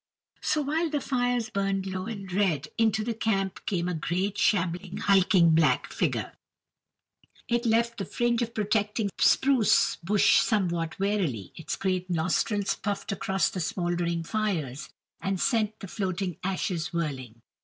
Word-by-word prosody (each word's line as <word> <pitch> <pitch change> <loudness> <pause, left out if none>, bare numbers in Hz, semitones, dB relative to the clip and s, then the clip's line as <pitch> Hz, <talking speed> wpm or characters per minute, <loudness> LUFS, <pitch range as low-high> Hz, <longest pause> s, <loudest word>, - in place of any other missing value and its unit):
So, 305 - +1
while 315 +4 0
the 295 -1 -1
fires 245 -4 -1
burned 195 -1 -1
low 185 0 -4
and 195 -5 -6
red, 165 -7 +1
into 220 -1 +2
the 230 +1 -2
camp 195 -4 -1
came 180 -4 0
a 180 - -1
great, 180 +5 -1
shambling, 185 -2 0
hulking 190 -3 +4
black 160 0 +2
figure; - - -1 1.1
it 240 0 0
left 230 +1 +1
the 195 - -2
fringe 240 0 0
of 235 0 -3
protecting 210 0 0
spruce 265 -6 +4
bush 200 +4 +4
somewhat 170 -6 0
warily; 185 - -1
its 165 - -4
great 185 -1 -2
nostrils 185 +4 0
puffed 205 +1 -3
across 195 -2 0
the 185 - -4
smoldering 175 0 -1
fires, 165 - -2 0.3
and 195 -1 -1
sent 220 -1 +1
the 200 - -7
floating 185 -3 -3
ashes 185 -2 -2
whirling. 130 -9 -4
195 Hz, 145 wpm, -27 LUFS, 175-220 Hz, 1.1 s, hulking